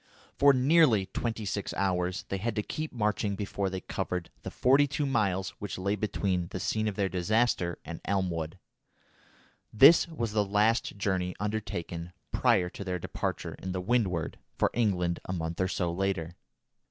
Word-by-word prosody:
For 140 0 +6
nearly 130 - +4
twenty 110 +3 -3
six 100 0 -3
hours 90 -1 0
they 95 - -1
had 115 +5 -2
to 105 - 0
keep 155 +6 -4
marching 105 -3 0
before 100 -1 -2
they 95 0 -4
covered 90 0 -4
the - - -5
forty 135 +3 +4
two 145 +1 -1
miles 100 -8 0
which 105 - -5
lay 100 +2 0
between 95 -4 -1
the 95 - -5
scene 110 +4 0
of 105 - -2
their 100 -2 +1
disaster 95 -1 +1
and 85 - -7
Elmwood. 90 -4 -1 1.1
This 140 +12 +7
was 120 -10 -3
the 105 -1 +2
last 105 +2 +1
journey 95 -2 -1
undertaken 90 -5 -4 0.2
prior 90 -2 +3
to - - -7
their 90 -2 -2
departure - - -4
in 95 -1 -4
the 95 - -2
Windward 90 -5 0 0.2
for - - +2
England 90 -7 +1
a 95 - -3
month 80 0 -3
or 95 - +2
so 90 -2 -1
later. 90 -3 -2
100 Hz, 165 wpm, -29 LUFS, 90-110 Hz, 1.1 s, This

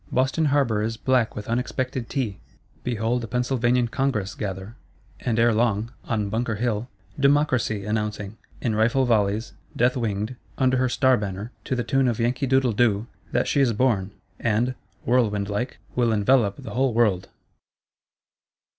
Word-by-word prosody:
Boston 130 +5 +1
Harbour 135 -7 +2
is 115 +1 -2
black 125 -2 +1
with 105 - -6
unexpected 125 +1 -2
Tea: 115 -8 -2 0.4
behold 120 0 -1
a - - -4
Pennsylvanian 125 0 +1
Congress 115 -7 -1
gather; 95 +2 -5 0.4
and 115 -2 -1
ere 115 0 +4
long, 110 0 +1
on 105 -3 -1
Bunker 110 +2 -1
Hill, 115 +1 -1 0.3
DEMOCRACY 135 -7 +2
announcing, 105 -1 -2 0.3
in 115 - 0
rifle 115 +5 +2
volleys 110 -1 +1 0.2
death 125 +1 +3
winged, 110 -1 -2 0.2
under 130 0 +3
her 130 0 +2
Star 130 0 +3
Banner, 100 +2 -5
to 130 - -1
the 120 - -1
tune 135 +1 +2
of 120 -2 0
Yankee 125 +4 0
doodle 130 -2 +3
doo, 110 -1 +2 0.3
that - - +1
she 140 - +2
is 125 -4 +3
born, 110 -5 +1 0.3
and, 115 +3 +1 0.3
whirlwind 105 -5 +1
like, 120 +5 -2 0.2
will 120 -2 +2
envelope 105 -1 +3
the - - -8
whole 130 -2 +1
world! 100 -6 +2
115 Hz, 155 wpm, -24 LUFS, 105-125 Hz, 0.4 s, ere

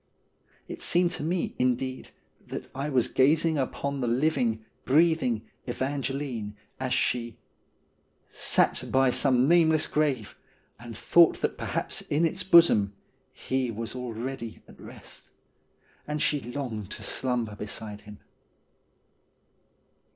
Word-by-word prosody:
It - - -8
seemed 175 0 +3
to 180 - -4
me, 170 +3 -1
indeed, 130 +1 -1 0.4
that - - -7
I 140 +3 -3
was 130 -4 +2
gazing 155 +3 +3
upon 140 +1 -3
the 120 - 0
living, 120 -4 0 0.2
breathing 150 -6 +2 0.2
Evangeline 130 -4 -3 0.2
as 130 -1 -3
she 120 -3 0 0.9
Sat - - +1
by 130 -1 +4
some 130 -1 +3
nameless 160 -2 +4
grave, 140 -8 -1 0.4
and 120 -2 -9
thought 170 -1 +4
that - - 0
perhaps - - -2
in 155 +4 0
its 180 +3 -1
bosom 170 - +5 0.4
He 130 -1 -2
was 115 0 -5
already 120 -1 -6
at - - -16
rest. - - -12 0.8
And 150 0 -2
she 145 -1 +1
longed 120 -6 -5
to - - -9
slumber 120 -5 -1
beside 105 0 -6
him. 105 0 -12
130 Hz, 120 wpm, -27 LUFS, 115-150 Hz, 0.9 s, bosom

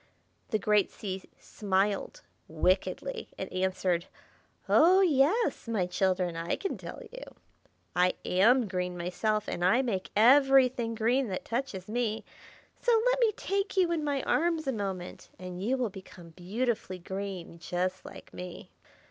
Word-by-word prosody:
The 215 - +1
great 210 -1 +2
Sea 190 -3 -6
smiled, 200 0 -1 0.2
wickedly, 185 - -1
and - - -6
answered, 185 -1 0 0.6
"Oh, 365 +4 +6
yes, 335 - +2
my 215 -6 0
children, 180 -1 0
I 165 +1 -1
can 390 - -3
tell - - -9
you! - - -9 0.7
I 180 +1 +3
am 225 +6 +4
green 180 -1 -3
myself, 210 +5 -1
and 175 - -3
I 230 +9 +4
make 195 -7 -2
everything 255 0 +5
green 240 +4 +1
that 190 -3 -4
touches 230 -7 -3
me. 220 -1 -2 0.6
So 475 -2 +4
let - - 0
me 465 -3 +4
take 395 -1 -2
you 360 -2 +3
in 325 -3 0
my 285 -2 -1
arms 330 -1 +1
a 270 - 0
moment, 195 -6 -5
and 180 0 -7
you 255 +5 +1
will 245 -5 -1
become 185 -2 -12
beautifully 190 +3 -2
green, 185 -2 -6
just 185 +2 -2
like - - -12
me." 180 -1 -8
210 Hz, 145 wpm, -29 LUFS, 185-270 Hz, 0.7 s, Oh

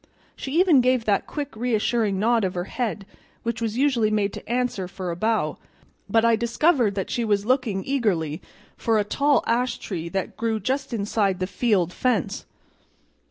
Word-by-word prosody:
She 280 +5 -2
even 345 -8 +6
gave 255 -2 +2
that 205 -2 +1
quick 285 -5 -5
reassuring 225 -3 0
nod 225 +2 +2
of 185 -1 -1
her 175 - -1
head 215 -1 -3 0.4
which 235 0 -3
was 225 0 -2
usually 255 -6 +2
made 210 -2 0
to - - -9
answer 240 -6 -1
for 185 -1 -5
a - - -3
bow, 215 -5 0 0.5
but 225 +2 +3
I 230 0 +5
discovered 235 - +2
that 195 - -3
she 240 - 0
was 205 -2 +1
looking 240 -6 +1
eagerly 190 - 0 0.4
at 225 -1 +3
a - - +2
tall 285 +7 +2
ash 245 +2 0
tree 170 -4 -5
that 190 +1 -3
grew 225 0 -1
just 265 +4 -2
inside 200 -3 0
the 185 - 0
field 190 -4 +1
fence. 240 -9 -1
225 Hz, 175 wpm, -24 LUFS, 195-245 Hz, 0.5 s, even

